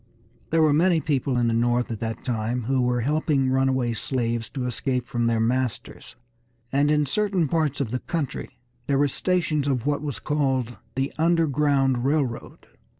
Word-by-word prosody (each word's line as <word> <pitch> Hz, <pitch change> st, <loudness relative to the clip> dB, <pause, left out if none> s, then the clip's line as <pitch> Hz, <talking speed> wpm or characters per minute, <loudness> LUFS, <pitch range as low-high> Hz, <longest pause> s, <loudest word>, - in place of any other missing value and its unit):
There 165 Hz, 0 st, +3 dB
were 150 Hz, -2 st, +4 dB
many 170 Hz, +2 st, +3 dB
people 135 Hz, -4 st, 0 dB
in 120 Hz, -1 st, +2 dB
the 115 Hz, -, +1 dB
North 120 Hz, +1 st, +1 dB
at 110 Hz, -, -4 dB
that 115 Hz, -1 st, -4 dB
time 120 Hz, 0 st, -1 dB
who 130 Hz, +3 st, +1 dB
were 125 Hz, 0 st, +1 dB
helping 145 Hz, 0 st, +1 dB
runaway 130 Hz, -2 st, +1 dB
slaves 115 Hz, -1 st, -2 dB
to 130 Hz, -3 st, -4 dB
escape 125 Hz, +1 st, -1 dB
from 120 Hz, -4 st, -1 dB
their 115 Hz, -1 st, +1 dB
masters, 125 Hz, +1 st, -2 dB, 0.6 s
and 140 Hz, +2 st, +2 dB
in 150 Hz, -1 st, +3 dB
certain 195 Hz, +1 st, 0 dB
parts 155 Hz, -2 st, 0 dB
of 130 Hz, -6 st, -2 dB
the 125 Hz, -, -1 dB
country 160 Hz, -4 st, -4 dB, 0.3 s
there 140 Hz, -, +2 dB
were 145 Hz, +1 st, +3 dB
stations 155 Hz, -1 st, 0 dB
of 130 Hz, -3 st, 0 dB
what 145 Hz, -1 st, 0 dB
was 145 Hz, -7 st, -4 dB
called 135 Hz, -2 st, -1 dB, 0.2 s
the 135 Hz, +1 st, -1 dB
"Underground 145 Hz, -6 st, +2 dB
Railroad." 135 Hz, -4 st, -2 dB
135 Hz, 170 wpm, -24 LUFS, 120-150 Hz, 0.6 s, were